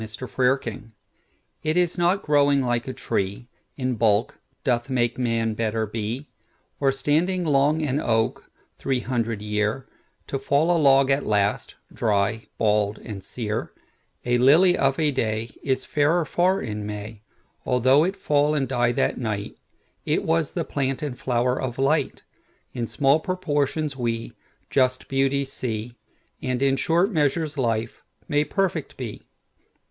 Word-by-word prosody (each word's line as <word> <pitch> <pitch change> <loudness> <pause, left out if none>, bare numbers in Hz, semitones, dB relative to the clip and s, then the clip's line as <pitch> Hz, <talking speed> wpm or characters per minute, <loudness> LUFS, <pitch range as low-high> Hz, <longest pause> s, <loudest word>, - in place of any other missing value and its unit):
The 110 - -5
Noble 130 0 +1
Nature 115 -3 -8 0.7
IT 155 +1 0
is 175 -1 +2
not 175 +3 +1
growing 145 -2 +3
like 120 -1 -1
a - - -2
treeIn 120 +4 -4
bulk, 105 0 +2 0.2
doth 120 -3 0
make 120 -1 0
Man 115 -2 0
better 110 0 -1
be; 115 +6 -4 0.5
Or 135 -1 +3
standing 160 +7 0
long 150 +1 +2
an 145 -1 0
oak, 115 -4 0 0.3
three 130 -2 0
hundred 115 -4 -2
year, 105 +4 -1 0.4
To 135 - -3
fall 145 +6 +2
a - - +2
log 135 -2 +5
at 135 +1 +2
last, 105 -1 0 0.2
dry, 105 0 0
bald, 105 -1 +1
and 100 -4 -8
sere:A 115 +2 -4
lily 165 +8 +6
of 135 -1 +1
a 150 -3 +1
dayIs 120 +3 -2
fairer 155 +3 +2
far 180 +6 +2
in 105 -3 -4
May, 105 +1 -7 0.4
Although 130 +4 +4
it 190 +3 -1
fall 150 -5 +1
and 135 -3 0
die 120 -2 +1
that - - 0
night—It 110 +6 -4
was 165 -2 0
the 170 -3 -2
plant 135 0 -2
and 140 -4 -3
flower 125 0 0
of 125 -2 -4
Light.In 135 -4 -3
small 140 +4 +3
proportions 155 -6 -1
we 115 -2 -3 0.4
just 130 -1 +1
beauties 135 0 0
see; 115 -1 -4 0.5
And 130 0 -1
in 135 -1 +3
short 170 +8 +2
measures 155 -1 0
life 115 -4 -1 0.3
may 150 -1 +2
perfect 170 -1 -2
be. 120 -5 -7
130 Hz, 140 wpm, -24 LUFS, 115-150 Hz, 0.7 s, lily